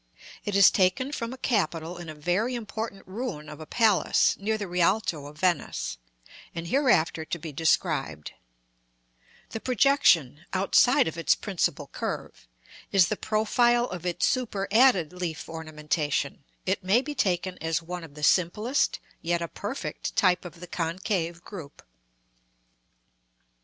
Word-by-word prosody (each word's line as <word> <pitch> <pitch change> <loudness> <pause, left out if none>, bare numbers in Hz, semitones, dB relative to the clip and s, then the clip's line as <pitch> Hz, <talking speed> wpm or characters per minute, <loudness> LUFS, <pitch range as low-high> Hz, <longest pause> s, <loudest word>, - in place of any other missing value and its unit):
It 205 -2 -2
is 200 -1 +8
taken 190 +8 +1
from 230 -5 -4
a 260 - -7
capital 175 -8 -1
in 170 -2 -8
a 155 - -7
very 180 +11 0
important 220 -3 -5
ruin 190 - -5
of 150 +1 -9
a 155 - -9
palace, 220 -1 +3
near 220 +2 0
the 205 -2 -4
Rialto 175 -4 +1
of 150 +1 -12
Venice, 170 - -1 0.6
and 165 0 -4
hereafter 180 - +2
to 165 - -4
be 160 -1 -7
described; 80 - 0 1.2
the 225 - -4
projection, 200 - +3
outside 195 +3 +4
of 160 +1 -4
its 165 -1 +3
principal 195 -5 -1
curve, - - -6 0.4
is 190 -3 +5
the 215 - 0
profile 240 +3 +2
of 180 -2 -6
its 175 -1 0
superadded 215 - +2
leaf 175 -3 -4
ornamentation; 150 -3 -3 0.2
it 190 0 -1
may 205 +8 +3
be 295 +2 -5
taken 180 -6 -1
as 165 0 -1
one 175 +1 -6
of 150 -3 -12
the 150 - -9
simplest, 210 - +2 0.2
yet 170 +1 0
a - - -3
perfect - - -5
type 180 -2 +3
of 170 -1 -10
the - - -6
concave 170 0 -2
group. 165 -9 -10
180 Hz, 140 wpm, -27 LUFS, 160-215 Hz, 1.2 s, is